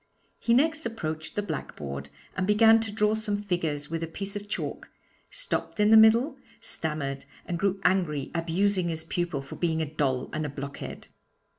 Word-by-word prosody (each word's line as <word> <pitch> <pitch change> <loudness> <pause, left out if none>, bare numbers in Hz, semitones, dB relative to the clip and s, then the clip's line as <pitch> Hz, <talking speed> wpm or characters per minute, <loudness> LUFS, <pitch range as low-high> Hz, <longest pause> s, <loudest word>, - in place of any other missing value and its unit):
He 235 - +3
next 315 +4 +3
approached 155 -8 -5
the 205 - 0
blackboard, 70 - -5 0.3
and 185 +1 0
began 225 +2 +6
to 220 -1 -3
draw 210 0 +2
some 210 -2 0
figures 160 -6 -2
with 165 0 -2
a 165 - -2
piece 195 +5 -4
of 205 0 -6
chalk, - - -4 0.4
stopped - - -3
in 210 +1 +5
the - - +9
middle, 225 +6 +6 0.2
stammered 140 -4 -3 0.2
and 170 -1 -3
grew 195 0 +1
angry, 155 -7 +1
abusing 175 +2 +1
his 160 -1 -2
pupil 165 -4 -2
for 135 - -9
being 165 -2 0
a 160 - +1
doll 140 -4 -1
and 155 - -1
a 150 - -2
blockhead. 140 0 -7
175 Hz, 175 wpm, -28 LUFS, 155-210 Hz, 0.4 s, the